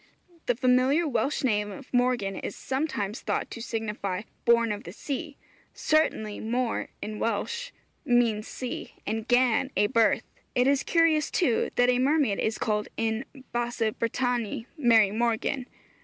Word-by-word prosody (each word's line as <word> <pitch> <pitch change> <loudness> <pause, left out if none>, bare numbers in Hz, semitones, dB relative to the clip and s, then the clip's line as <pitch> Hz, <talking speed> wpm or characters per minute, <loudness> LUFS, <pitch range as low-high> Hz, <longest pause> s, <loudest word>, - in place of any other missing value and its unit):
The 245 - +2
familiar 255 +6 +3
Welsh 285 +1 0
name 210 -4 +1
of 200 - -11
Morgan 245 -6 +1
is - - -5
sometimes 260 -6 -2
thought - - -2
to 230 - -7
signify, 210 -4 -3 0.2
'Born 235 -1 +4
of 205 +2 -4
the - - -8
Sea.' 285 +1 -5 0.4
Certainly 220 -9 +1
môr 240 +2 -1 0.2
in 215 0 -5
Welsh 470 - -2 0.3
means 235 -3 +2
sea, 250 -1 -6
and 220 +2 -3
gân 250 +1 +3
a 205 - +4
birth. 225 +1 +3 0.3
It 250 - +4
is 275 0 +3
curious, 325 -3 +3
too, 255 -11 +1
that 245 0 +4
a 250 - +1
mermaid 275 -5 +2
is 220 - 0
called 210 -1 -1
in 225 +2 -1 0.3
Basse 240 -2 0
Bretagne 235 -1 -1
'Mary 230 -8 +5
Morgan.' 235 +3 0
240 Hz, 145 wpm, -27 LUFS, 220-260 Hz, 0.4 s, Mary